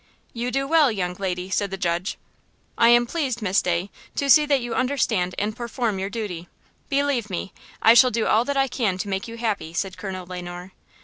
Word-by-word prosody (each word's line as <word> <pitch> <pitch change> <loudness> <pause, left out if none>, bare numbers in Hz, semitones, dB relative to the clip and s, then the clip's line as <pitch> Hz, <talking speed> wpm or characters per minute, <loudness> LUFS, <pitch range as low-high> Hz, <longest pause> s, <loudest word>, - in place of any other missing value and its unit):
"You 240 +1 -2
do 275 +2 -1
well, 305 -4 +4
young 180 -4 -2
lady," 185 -1 -3
said 200 +1 0
the 195 - -5
judge. 175 0 -1 0.6
"I 230 - +5
am 240 0 +6
pleased, 260 -3 -2
Miss 190 -1 +2
Day, 180 +2 -1 0.2
to 280 -1 +2
see 300 +1 +7
that 280 -2 +3
you 240 -1 -4
understand 250 -9 0
and 210 +1 -1
perform 235 -3 -2
your 195 +1 -2
duty; 200 -6 -5 0.4
believe 275 -6 0
me, 185 +1 -4 0.3
I 225 - +8
shall 255 +2 +7
do 230 -1 -1
all 220 +2 +3
that 280 +1 -1
I 270 0 +3
can 225 -7 -1
to 190 - -4
make 195 +1 -3
you 230 0 -8
happy," 210 -8 -2
said 190 +2 -3
Colonel 185 -2 -5
Le 180 0 -6
Noir. 175 +1 -8
215 Hz, 210 wpm, -23 LUFS, 185-250 Hz, 0.6 s, I